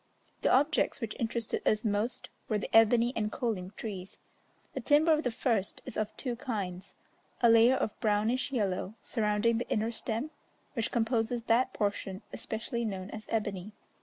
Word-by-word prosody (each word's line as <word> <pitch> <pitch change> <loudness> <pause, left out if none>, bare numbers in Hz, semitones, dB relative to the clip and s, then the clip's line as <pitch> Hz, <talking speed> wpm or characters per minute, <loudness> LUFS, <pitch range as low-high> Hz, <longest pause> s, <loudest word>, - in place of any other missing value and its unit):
The - - +2
objects 285 +4 +3
which 230 -4 -4
interested 230 -1 -1
us 215 +1 +2
most 215 +4 -1 0.2
were 215 - +2
the 210 - -3
ebony 230 +2 +6
and 215 -1 -1
kolim 210 -8 -2
trees. 195 -4 -6 0.6
The - - -3
timber 305 +2 +4
of 305 - +2
the 250 - 0
first 225 -4 -1
is - - -7
of 215 0 -2
two 250 -3 -3
kinds, 195 -7 -4 0.4
a 235 -2 +6
layer 230 +3 +7
of 220 - -2
brownish 225 +4 +1
yellow 205 -4 -1
surrounding 220 0 +1
the 245 - -4
inner 220 +2 +1
stem, 235 +5 -3 0.4
which 230 -5 -1
composes 235 0 0
that 245 +3 +2
portion 200 -1 -2
especially 230 +1 -3
known 195 -3 -4
as 215 0 -8
ebony. 205 -2 -2
225 Hz, 165 wpm, -31 LUFS, 210-240 Hz, 0.6 s, layer